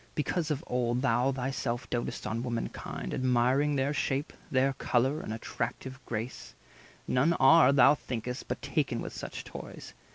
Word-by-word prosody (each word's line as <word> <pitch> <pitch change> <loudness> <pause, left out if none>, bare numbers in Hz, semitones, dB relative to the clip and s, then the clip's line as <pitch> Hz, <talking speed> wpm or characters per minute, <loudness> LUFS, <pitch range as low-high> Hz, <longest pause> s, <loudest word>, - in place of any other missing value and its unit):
Because 155 +2 -1
of 150 +1 -2
old 125 0 0
Thou 125 +1 +3
thyself 130 -2 -2
doat'st 120 -1 -3
on 115 +1 -2
womankind, 120 -2 -4
admiring 130 +3 +2
Their 140 +2 +1
shape, 140 0 -1 0.2
their 135 +1 +2
colour, 130 +3 +1
and - - -6
attractive 130 +3 -5
grace, 115 +2 -5 0.5
None 140 +7 +3
are, 155 -1 +7
thou 140 +1 +7
think'st, 125 -3 -5
but - - -4
taken - - 0
with - - -5
such - - -6
toys. - - -9
130 Hz, 150 wpm, -30 LUFS, 120-140 Hz, 0.5 s, are